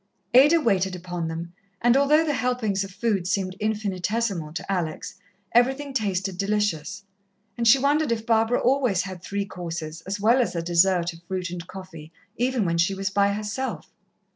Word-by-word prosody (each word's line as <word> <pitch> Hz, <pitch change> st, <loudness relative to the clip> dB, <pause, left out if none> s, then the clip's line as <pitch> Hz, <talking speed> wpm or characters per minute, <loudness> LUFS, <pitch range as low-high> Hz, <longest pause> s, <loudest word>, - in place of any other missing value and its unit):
Ada 295 Hz, +7 st, +7 dB
waited 190 Hz, -, +1 dB
upon 175 Hz, -1 st, -4 dB
them, 165 Hz, +1 st, -6 dB, 0.3 s
and 240 Hz, +1 st, +4 dB
although 295 Hz, +3 st, +4 dB
the 300 Hz, -, 0 dB
helpings 245 Hz, -7 st, 0 dB
of 195 Hz, -, -7 dB
food 195 Hz, -2 st, -1 dB
seemed 185 Hz, -1 st, -1 dB
infinitesimal 205 Hz, -4 st, -1 dB
to 185 Hz, -, -5 dB
Alex, 175 Hz, -5 st, -3 dB, 0.4 s
everything 265 Hz, +4 st, +2 dB
tasted 195 Hz, -5 st, -1 dB
delicious, 200 Hz, -2 st, -1 dB, 0.5 s
and 235 Hz, -1 st, 0 dB
she 230 Hz, -, +8 dB
wondered 285 Hz, +1 st, +1 dB
if 225 Hz, -1 st, -1 dB
Barbara 225 Hz, +1 st, +2 dB
always 250 Hz, -8 st, +2 dB
had 185 Hz, -2 st, -7 dB
three 200 Hz, +2 st, -3 dB
courses 165 Hz, -4 st, -6 dB
as 200 Hz, +2 st, -3 dB
well 230 Hz, +5 st, +4 dB
as 235 Hz, -, -2 dB
a 170 Hz, -, -2 dB
dessert 175 Hz, 0 st, +2 dB
of 165 Hz, -, -14 dB
fruit 185 Hz, -2 st, -3 dB
and 175 Hz, 0 st, -7 dB
coffee, 175 Hz, -5 st, -10 dB, 0.2 s
even 245 Hz, -2 st, 0 dB
when 170 Hz, -1 st, 0 dB
she 175 Hz, +3 st, +2 dB
was 195 Hz, 0 st, -2 dB
by 200 Hz, 0 st, +2 dB
herself. 210 Hz, +5 st, -4 dB
200 Hz, 170 wpm, -25 LUFS, 180-235 Hz, 0.5 s, she